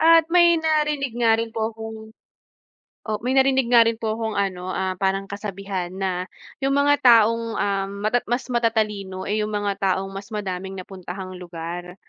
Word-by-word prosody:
at 330 0 +6
may 345 -1 +6
narinig 300 -5 0
nga 230 -2 +3
rin 230 0 -2
po 220 0 -1
akong 220 0 -8 1.1
oh, 215 - -1
may 250 +2 -1
narinig 265 -2 +4
nga 235 -2 +7
rin 230 0 +1
po 220 -1 -1
kung 220 -1 -2
ano 185 -2 -2
ah, 190 -1 -1
parang 195 +1 -1
kasabihan 195 -3 -4
na 185 -1 -2 0.4
yung 275 0 +2
mga 285 +1 +4
taong, 230 -1 +6 0.2
ah, 195 -1 0
mata 210 +5 -1
mas 245 +3 -1
matatalino 215 -5 -1
eh, 215 +1 +1
yung 215 - -3
mga 205 -1 0 0.2
taong 195 0 -3
mas 195 +2 -8
madaming 190 -2 -4
napuntahang 185 0 -8
lugar. 175 0 -7
210 Hz, 170 wpm, -23 LUFS, 190-240 Hz, 1.1 s, nga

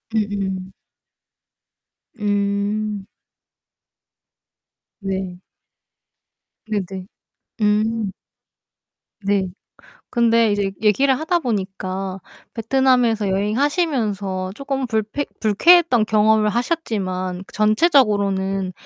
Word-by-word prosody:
음음. 195 -3 -2 1.5
음. 205 0 -1 2.0
네. 190 -2 -4 1.2
네 215 -2 -1
네. 190 -1 -7 0.6
음. 215 0 +1 1.1
네. 200 -1 +1 0.6
근데 230 -2 +3
이제 200 -1 0
얘기를 255 +5 +3
하다 345 +2 0
보니까 195 - -3 0.3
베트남에서 235 -2 +2
여행하시면서 210 - 0
조금 275 +1 -3
불패 220 +4 -1 0.2
불쾌했던 245 - +5
경험을 215 0 +3
하셨지만 190 - -2
전체적으로는 205 - +2
210 Hz, 165 characters per minute, -21 LUFS, 195-235 Hz, 2.0 s, 불쾌했던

